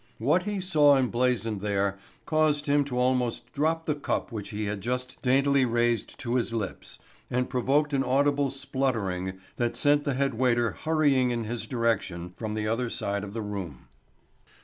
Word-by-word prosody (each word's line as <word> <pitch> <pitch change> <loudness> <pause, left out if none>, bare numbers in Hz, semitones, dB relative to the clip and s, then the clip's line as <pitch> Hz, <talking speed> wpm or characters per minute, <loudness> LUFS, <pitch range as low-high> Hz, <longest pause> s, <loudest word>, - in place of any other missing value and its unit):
What 155 +10 +2
he 205 -1 -2
saw 150 -6 +5
emblazoned 120 -4 0
there 100 -1 0 0.3
caused 155 -2 +2
him 145 0 +3
to 125 -3 -4
almost 125 -1 0
drop 160 +3 0
the 150 - +1
cup 145 -4 -2
which 105 -3 -5
he 105 0 -3
had 100 -1 -3
just 125 +3 -3
daintily 135 +1 +3
raised 120 -2 0
to 120 - -2
his 115 -1 -1
lips 105 -4 -5 0.3
and 125 +1 -1
provoked 140 +4 +1
an 135 -1 +2
audible 140 +2 +2
spluttering 115 -9 -2 0.2
that 120 -1 0
sent 145 0 +3
the 140 -3 -1
head 135 0 +1
waiter 120 -1 +2
hurrying 145 -5 +2
in 120 -1 -1
his 115 +2 -4
direction 100 -8 -1
from 110 -2 -4
the 105 0 -2
other 115 +2 0
side 100 -2 -2
of 100 -1 -7
the 115 -1 -3
room. 95 -9 -6
125 Hz, 170 wpm, -27 LUFS, 110-140 Hz, 0.3 s, saw